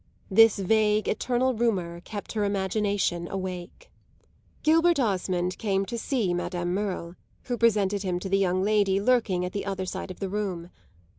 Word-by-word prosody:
This 225 +2 +6
vague 210 +2 +2
eternal 255 +3 +1
rumour 190 -8 -1
kept 205 +2 -7
her 215 -2 -1
imagination 200 -3 0
awake. 185 - -6 0.7
Gilbert 330 +1 +4
Osmond 185 -5 -1
came 195 -3 0
to 235 - -5
see 230 -6 -1
Madame 175 0 -2
Merle, 185 -4 -3 0.3
who 245 - -2
presented 205 -4 +2
him 185 -2 -1
to 195 - -4
the 195 +1 +2
young 185 -1 +1
lady 200 -2 +2
lurking 205 -5 +2
at 180 - -4
the 200 - -4
other 190 -1 -2
side 185 - -5
of 185 - -9
the 195 - -2
room. 185 -4 -4
195 Hz, 160 wpm, -26 LUFS, 185-220 Hz, 0.7 s, This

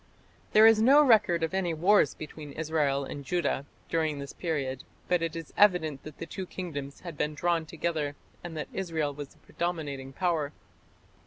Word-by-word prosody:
" - - -32
There 215 +1 +8
is 225 -1 +7
no 275 +6 +7
record 190 -9 +4
of 160 - -1
any 180 -3 0
wars 195 +6 +4
between 150 -2 -9
Israel 150 -3 0
and 140 +1 -7
Judah 145 -3 -1 0.2
during 160 -3 0
this 140 0 -7
period, 140 -6 -3 0.2
but 180 -1 +2
it 165 -1 -2
is 165 -2 -7
evident 160 -9 +3
that 155 -1 -11
the - - -5
two 185 +3 -6
kingdoms 145 -8 -6
had 170 -3 -7
been 150 0 -1
drawn 170 0 0
together 155 -3 -2 0.3
and 170 -2 -6
that 150 - -3
Israel 160 -6 -2
was 145 0 -7
the - - -23
predominating 145 -6 -4
power. 155 -2 -1
160 Hz, 180 wpm, -29 LUFS, 145-175 Hz, 0.3 s, There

